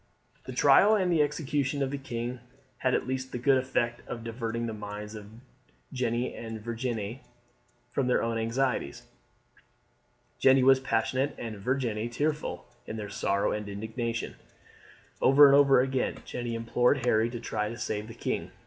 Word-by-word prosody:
The - - -6
trial 210 +2 +5
and 185 -4 +1
execution 145 -2 0
of 135 - -2
the 140 - -2
king 120 -1 -4 0.4
had 130 -1 +2
at - - -1
least 130 0 -3
the - - -3
good 130 +2 +3
effect 120 -2 -1
of 115 -2 -6
diverting 115 0 -3
the 115 - -3
minds 105 0 -7
of 105 -2 -9 0.7
Jeanne 120 -1 -1
and 115 -1 -6
Virginie 115 +1 -4 0.7
from 130 0 0
their 125 - +2
own 115 0 -1
anxieties. 115 - -1 1.4
Jeanne 130 -1 +5
was 135 0 +6
passionate 130 +2 0
and 110 -3 -6
Virginie 120 -1 -1
tearful 150 +5 -2 0.2
in 110 - -5
their 105 -2 -5
sorrow 100 0 0
and 105 -1 -4
indignation. 115 +3 -4 0.8
Over 140 +2 +8
and 140 - +7
over 140 -2 +6
again 130 0 -1
Jeanne 120 -1 -5
implored 120 +3 +1
Harry 115 -1 +3
to 120 0 -6
try 105 -2 -2
to 115 - -7
save 105 -1 -3
the 115 - -10
king. - - -3
120 Hz, 160 wpm, -28 LUFS, 115-130 Hz, 1.4 s, Over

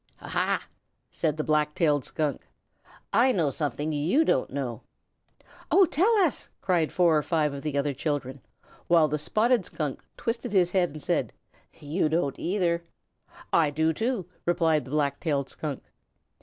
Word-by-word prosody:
"Aha!" - - -1 0.5
said 155 -2 -1
the 155 - -1
Black 150 -1 +1
tailed 150 -5 +2
Skunk. 150 -4 -3 0.7
"I 240 +6 +5
know 165 - +1
something 150 +2 -2
you 170 - +2
don't 130 - +1
know." 130 -3 -4 0.9
"Oh, 390 - +6
tell 360 +7 +2
us!" 305 - -3
cried 175 -5 +1
four 175 -3 +3
or 150 - +3
five 150 -2 0
of 140 - -6
the 150 -1 -2
other 140 0 0
children, 140 -2 -3 0.5
while 165 -2 +5
the 150 +1 -2
Spotted 225 - +2
Skunk 150 -4 -4 0.2
twisted 230 -2 -3
his 180 -3 +3
head 180 -2 +2
and 150 0 -10
said, - - 0 0.5
"You 155 +2 0
don't 155 -4 -1
either!" 170 -2 0 0.7
"I 160 -3 +4
do 160 +2 +1
too!" 225 +1 -1 0.2
replied 165 -5 +2
the - - -11
Black 145 -1 0
tailed 140 -5 -1
Skunk. 150 -4 -5
155 Hz, 155 wpm, -27 LUFS, 145-180 Hz, 0.9 s, Oh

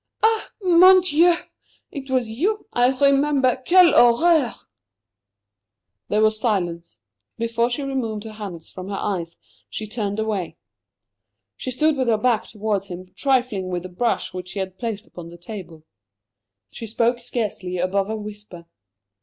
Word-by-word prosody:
"Ah, 445 0 +2
mon 370 +1 +7
Dieu! 345 0 +4 0.6
It 275 -1 -7
was 255 -3 +1
you 365 - -1
I 245 0 +4
remember. 275 0 +3
Quelle 360 -1 +7
horreur!" 265 +3 +4 1.5
There 215 +1 +2
was 215 0 +2
silence. 175 - -2 0.4
Before 230 +1 0
she 265 +4 -3
removed 235 -6 -3
her 220 - -8
hands 200 -6 -7
from 185 +1 -8
her 200 - -3
eyes 170 -5 -3 0.3
she 215 - -5
turned 210 -2 -3
away. 215 -5 -3 1.0
She - - -6
stood 300 +4 +1
with 260 -2 0
her 225 -2 +3
back 230 0 +1
towards 210 -2 -2
him, 185 0 -9
trifling 250 -8 0
with 180 -1 -3
a - - -7
brush 230 +7 -1
which 180 0 -7
he 200 - -4
had 190 -1 -5
placed 225 -2 -4
upon 170 -1 -11
the 170 - -12
table. 175 -4 -9 0.9
She 225 - -8
spoke 235 +2 +1
scarcely 210 -7 -3
above 190 +3 0
a 220 - -2
whisper. 210 -5 -9
220 Hz, 150 wpm, -22 LUFS, 195-260 Hz, 1.5 s, mon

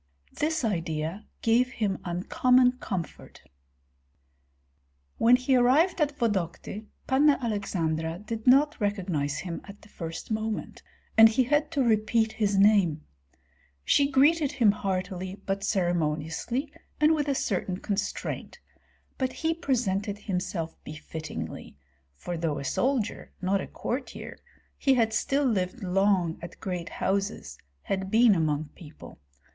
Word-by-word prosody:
This 315 -3 -1
idea 165 -1 -2 0.2
gave 245 +3 +3
him 200 -4 -1
uncommon 250 +8 +2
comfort. 185 -9 -6 1.8
When 240 +2 +6
he 255 +1 +2
arrived 290 +9 +4
at 290 -1 0
Vodokty, 210 0 -2 0.2
Panna 280 +2 +4
Aleksandra 170 -8 -2
did 220 +4 -6
not 280 +2 +5
recognize 180 -9 -1
him 175 -2 -5
at 200 +1 -13
the 215 - -17
first 165 +3 -7
moment, 220 0 -3 0.4
and 225 0 +10
he 240 +4 +2
had 295 +4 +1
to 275 - +2
repeat 220 0 +2
his 205 -2 0
name. 195 -7 +4 0.8
She 280 -1 +4
greeted 290 +2 +3
him 230 -7 +4
heartily, 190 -2 -3
but 195 0 -2
ceremoniously 175 - -1 0.3
and 305 +1 +5
with 295 -2 0
a 280 - +1
certain 185 -5 -1
constraint; 200 +1 -4 0.6
but 260 -1 0
he 325 +3 -1
presented 210 - -1
himself 180 -4 -3
befittingly, 155 - -7 0.4
for 175 - -5
though 160 -3 -1
a 140 - -5
soldier, 245 - -1
not 190 +1 +1
a - - -6
courtier, 255 +2 -5 0.4
he 270 -1 +3
had 225 -2 +2
still 275 +5 +1
lived 205 -1 -1
long 185 -2 +1
at 170 - -9
great 180 -3 -4
houses, 195 - -2 0.2
had 190 -1 -2
been 225 +1 +6
among 155 -3 0
people. 155 -3 -13
205 Hz, 130 wpm, -27 LUFS, 180-250 Hz, 1.8 s, and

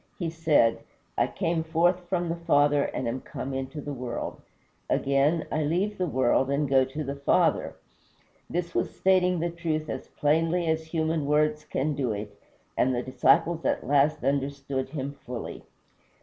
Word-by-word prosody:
He 170 -6 -2
said, 160 -8 +3 0.4
"I - - +2
came 165 0 -1
forth 170 +3 +2
from 175 -2 0
the 165 - -1
Father, 145 -3 +3
and 130 - -3
am 125 +3 -3
come 135 - -6
into 135 +2 -4
the 145 0 -5
world. 125 -2 -5 0.5
Again, 140 +4 +2
I 155 - 0
leave 185 +8 0
the 180 - +1
world, 130 -1 +2
and 140 +1 +1
go 135 -1 +4
to 145 +4 -5
the 140 0 -4
Father." 140 - +2 0.7
This 175 0 -3
was - - -1
stating 180 -2 +3
the 170 0 -1
truth 160 -2 -2
as - - -6
plainly 165 +4 +1
as 160 0 0
human 160 -2 -1
words 150 +1 +2
can 150 0 -1
do 130 -5 -1
it, 105 0 -6 0.4
and 130 0 +2
the 120 - -1
disciples 140 +6 +2
at - - 0
last 145 +3 +2
understood 140 -1 -1
him 140 -2 -5
fully. 125 -2 -6
150 Hz, 165 wpm, -27 LUFS, 135-165 Hz, 0.7 s, go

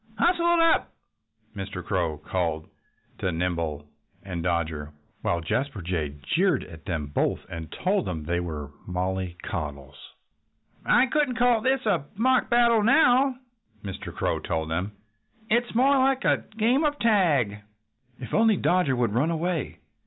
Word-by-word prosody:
"Hustle 345 - +2
it - - +2
up!" 330 0 +3 0.6
Mr. 95 -3 -6
Crow 85 -5 -1
called 80 -3 -2 0.5
to 95 - 0
Nimble 80 -4 -2 0.4
and 90 -4 -5
Dodger, 80 -3 -2 0.3
while 85 - 0
Jasper 115 - -2
Jay 80 -5 -2
jeered 170 - +1
at 80 -2 -13
them 80 -5 -2
both 70 - -1
and 80 -2 -7
told 190 0 0
them 80 -3 -4
they 85 +2 0
were 75 -5 -5 0.2
mollycoddles. 90 -6 -4 0.7
"I 250 +2 +4
shouldn't 285 -3 0
call 245 -2 +3
this 260 +2 +1
a 205 -9 +1
mock 255 +4 +2
battle 235 -2 +4
now," 260 +2 +4 0.5
Mr. 95 -2 -6
Crow - - -1
told 80 -1 -3
them. 90 +6 -2 0.6
"It's 240 0 +1
more 270 +3 +4
like 265 0 +2
a - - +2
game 240 +7 +3
of 295 -1 +1
tag." 155 - +2 0.6
"If 125 -4 -8
only 220 -2 +4
Dodger 175 -8 +2
would 120 -4 0
run 135 +8 +2
away!" 165 -2 -2
105 Hz, 145 wpm, -26 LUFS, -, 0.7 s, I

